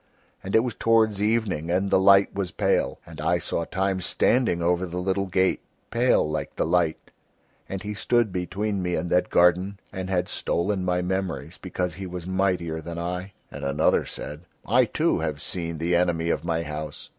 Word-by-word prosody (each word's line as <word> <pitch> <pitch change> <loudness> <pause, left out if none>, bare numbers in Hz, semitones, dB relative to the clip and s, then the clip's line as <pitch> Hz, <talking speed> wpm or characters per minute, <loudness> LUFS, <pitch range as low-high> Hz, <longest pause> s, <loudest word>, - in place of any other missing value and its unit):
And 95 - -2
it 110 - +7
was 125 -2 -2
towards 110 -3 +2
evening 105 -7 0
and 95 +3 +1
the - - +5
light 100 +1 +5
was 100 -2 -2
pale, - - 0
and - - -9
I - - +2
saw 85 - -2
Time 95 +1 -1
standing 115 +1 +2
over 90 +2 +1
the 90 +1 -6
little 95 +2 0
gate, 95 0 +1 0.3
pale 120 -7 +3
like 75 0 -4
the - - 0
light, 85 -3 0 0.6
and 95 -1 -4
he 105 0 -4
stood 115 +2 +1
between 95 +3 -2
me 90 -1 -1
and 90 - -3
that 90 0 +2
garden 90 +3 +3
and 95 -1 -4
had 90 -1 0
stolen 95 +2 -1
my 90 0 0
memories 90 -3 -3
because 90 -2 -3
he 95 0 -6
was 90 -1 -6
mightier 90 -4 0
than 85 +1 -7
I." 90 +3 -4 0.2
And - - -8
another 70 +3 +2
said: 75 +5 -8 0.2
"I, 125 +3 +4
too, 155 - +1
have 80 -3 -2
seen 85 0 -4
the 85 +2 +1
Enemy 85 -1 +1
of - - -1
my 85 -1 -1
House. 75 -1 -6
90 Hz, 190 wpm, -25 LUFS, 85-100 Hz, 0.6 s, it